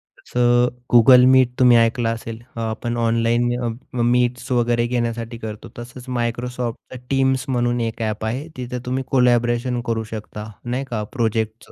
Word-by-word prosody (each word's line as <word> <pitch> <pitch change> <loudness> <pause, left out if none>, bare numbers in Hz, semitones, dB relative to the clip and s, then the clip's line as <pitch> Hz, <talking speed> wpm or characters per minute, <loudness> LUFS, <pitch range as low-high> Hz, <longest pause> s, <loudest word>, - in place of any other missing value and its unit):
तसं 120 0 +1 0.3
Google 125 +1 +8
meet 130 -2 +5
तुम्ही 125 -2 +6
ऐकलं 115 0 +2
असेल. 115 0 -5 0.2
आपण 115 +1 -3
ऑनलाईन 115 +1 +1 0.2
अ, 120 +1 -5
मीट्स 125 +1 +1
वगैरे 120 -1 +2
घेण्यासाठी 115 -1 -2
करतो 110 -1 -8
तसंच 125 +1 -10
Microsoftचं 120 +1 -4
टीम्स 135 -1 +1
म्हणून 120 -1 0
एक 115 0 -3
ॲप 110 -1 -2
आहे 130 +7 -3
तिथं 125 0 -4
तुम्ही 130 +1 -2
कोलॅबोरेशन 120 -1 +2
करू 115 -1 -1
शकता 105 0 -7
नाही 125 +3 -2
का? 110 -3 -2
प्रोजेक्टचं. 110 -2 -2
120 Hz, 145 wpm, -21 LUFS, 115-125 Hz, 0.3 s, Google